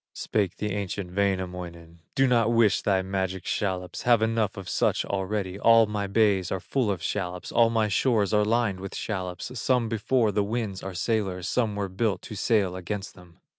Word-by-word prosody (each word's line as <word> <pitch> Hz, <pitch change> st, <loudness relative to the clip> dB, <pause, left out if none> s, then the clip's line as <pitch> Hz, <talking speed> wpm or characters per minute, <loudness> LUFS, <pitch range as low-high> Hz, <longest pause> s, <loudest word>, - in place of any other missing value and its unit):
Spake 100 Hz, -5 st, -1 dB
the 105 Hz, 0 st, -2 dB
ancient 95 Hz, -2 st, -4 dB
Wainamoinen: 90 Hz, -4 st, -3 dB, 0.2 s
"Do 135 Hz, -, +4 dB
not 120 Hz, -3 st, +3 dB
wish 115 Hz, -3 st, +3 dB
thy 95 Hz, -2 st, +1 dB
magic 95 Hz, -1 st, -3 dB
shallops, 90 Hz, -3 st, -2 dB
Have 120 Hz, -2 st, +4 dB
enough 110 Hz, -3 st, 0 dB
of 100 Hz, -, -7 dB
such -, -, +1 dB
already; 95 Hz, 0 st, -3 dB
All 115 Hz, 0 st, +6 dB
my 105 Hz, -1 st, -3 dB
bays 100 Hz, -3 st, +2 dB
are 95 Hz, -, -1 dB
full 125 Hz, +4 st, -1 dB
of 95 Hz, -5 st, -2 dB
shallops, 90 Hz, -2 st, -3 dB
All 115 Hz, -1 st, +4 dB
my 115 Hz, -2 st, +1 dB
shores 105 Hz, 0 st, +1 dB
are 105 Hz, 0 st, +4 dB
lined 110 Hz, -3 st, +1 dB
with 95 Hz, 0 st, -7 dB
shallops, 95 Hz, 0 st, -4 dB
Some 125 Hz, -2 st, +1 dB
before 115 Hz, 0 st, +1 dB
the 100 Hz, +1 st, +1 dB
winds 105 Hz, -3 st, -3 dB
are 95 Hz, -1 st, -6 dB
sailors, 95 Hz, -2 st, -1 dB
Some 110 Hz, 0 st, 0 dB
were 100 Hz, -1 st, -2 dB
built 95 Hz, 0 st, -1 dB
to -, -, -8 dB
sail 100 Hz, -3 st, +1 dB
against 95 Hz, +2 st, -5 dB
them." 90 Hz, -2 st, -18 dB
100 Hz, 185 wpm, -26 LUFS, 95-110 Hz, 0.2 s, All